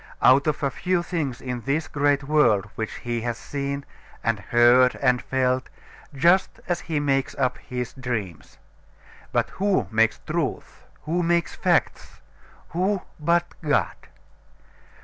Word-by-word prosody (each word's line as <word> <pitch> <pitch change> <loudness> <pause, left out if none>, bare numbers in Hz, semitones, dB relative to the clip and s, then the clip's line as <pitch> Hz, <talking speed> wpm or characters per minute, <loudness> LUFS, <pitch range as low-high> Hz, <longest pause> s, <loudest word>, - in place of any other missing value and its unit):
Out 135 +3 +6
of 150 - -1
a 140 - +1
few 180 +4 0
things 150 -8 -3
in 125 -2 -4
this 145 +6 -1
great 145 -1 +1
world 135 -9 +3
which 110 -1 -4
he 120 -1 -4
has 120 0 -3
seen, 140 +1 -4 0.4
and 115 -2 0
heard, 120 +3 +4
and 125 -2 +2
felt, 130 -1 0 0.5
just 175 +7 +3
as 175 - 0
he 155 -3 -2
makes 135 -2 0
up 130 -2 0
his 125 -3 -5
dreams. 115 - -5 0.7
But - - 0
who 195 - +2
makes 110 0 +3
truth? - - -4 0.2
Who 170 +4 0
makes 170 0 +1
facts? - - 0 0.5
Who, 185 +3 0 0.2
but 170 +3 +2 0.2
God? 150 -3 +1
135 Hz, 135 wpm, -24 LUFS, 125-160 Hz, 0.7 s, Out